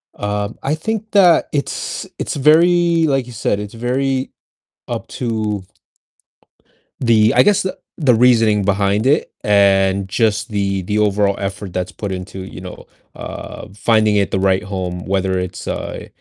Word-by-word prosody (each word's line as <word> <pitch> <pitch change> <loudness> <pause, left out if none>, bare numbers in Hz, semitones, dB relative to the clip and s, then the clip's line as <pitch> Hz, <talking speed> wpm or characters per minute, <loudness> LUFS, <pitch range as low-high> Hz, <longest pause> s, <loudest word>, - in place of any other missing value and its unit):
Um, 105 0 -3
I 145 +3 0
think 215 +6 -4
that 180 -5 +5
it's 145 -1 -3
it's - - -3
very, 165 +3 +4
like 135 -3 0
you 120 - -10
said, 105 -2 -1
"It's 105 +1 -7
very 130 +3 -1 0.6
up - - -4
to" 110 -5 -2 1.4
The 110 -2 +4
I - - +6
guess 205 -2 +3
the 185 - -4 0.2
the 135 -7 +3
reasoning 115 -4 +4
behind 100 +3 +1
it 145 - +2
and 100 -1 +3
just 110 +1 0
the 100 -2 -1
the 105 +3 -1
overall 100 -1 +2
effort 95 -1 -5
that's 90 0 -3
put 100 -2 -5
into, 95 +1 -6
you 95 -1 -9
know, 90 - -10 0.3
uh, - - -8
finding 110 -1 +2
it 100 - +1
the 95 - 0
right 95 0 +2
home, 90 -2 -4
whether 95 -1 0
it's, 90 0 -6
uh, - - -5
105 Hz, 155 wpm, -18 LUFS, 100-130 Hz, 1.4 s, I